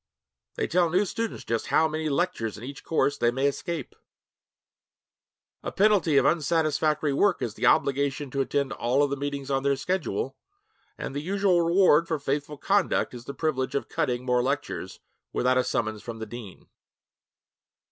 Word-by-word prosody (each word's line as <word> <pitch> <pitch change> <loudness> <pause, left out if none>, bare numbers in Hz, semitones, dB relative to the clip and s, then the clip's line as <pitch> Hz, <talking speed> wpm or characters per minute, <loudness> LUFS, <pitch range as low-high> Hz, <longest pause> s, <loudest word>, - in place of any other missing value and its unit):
They - - -1
tell 175 0 +2
new 185 +5 +2
students 225 +3 -4
just 115 -1 -2
how 160 - +3
many 155 0 -2
lectures 140 - -1
in 105 - -10
each 135 +2 -8
course 145 -3 +1
they 120 - +3
may 130 +3 -1
escape. 150 +1 -2 1.7
A - - -4
penalty 195 -7 +3
of - - +4
unsatisfactory 155 -2 +1
work 195 +6 +2
is 110 - -3
the - - 0
obligation 140 0 +1
to 140 -1 0
attend 140 0 -1
all 130 +5 +1
the 140 - -2
meetings 140 0 -4
on 135 0 +1
their 140 0 +2
schedule, 140 - -2 0.6
and - - -5
the 145 - -2
usual 190 +1 +2
reward 170 -2 +4
for 160 - 0
faithful 145 +1 -3
conduct 195 0 +1
is 120 -1 -9
the 140 - -7
privilege 135 -5 -1
of 140 - -2
'cutting' 125 0 -1
more 125 -1 +2
lectures 125 - -3 0.3
without 130 +1 +2
a - - +2
summons 110 -3 -2
from 115 -1 -7
the 110 - -5
dean. 110 -3 -10
140 Hz, 165 wpm, -26 LUFS, 130-165 Hz, 1.7 s, of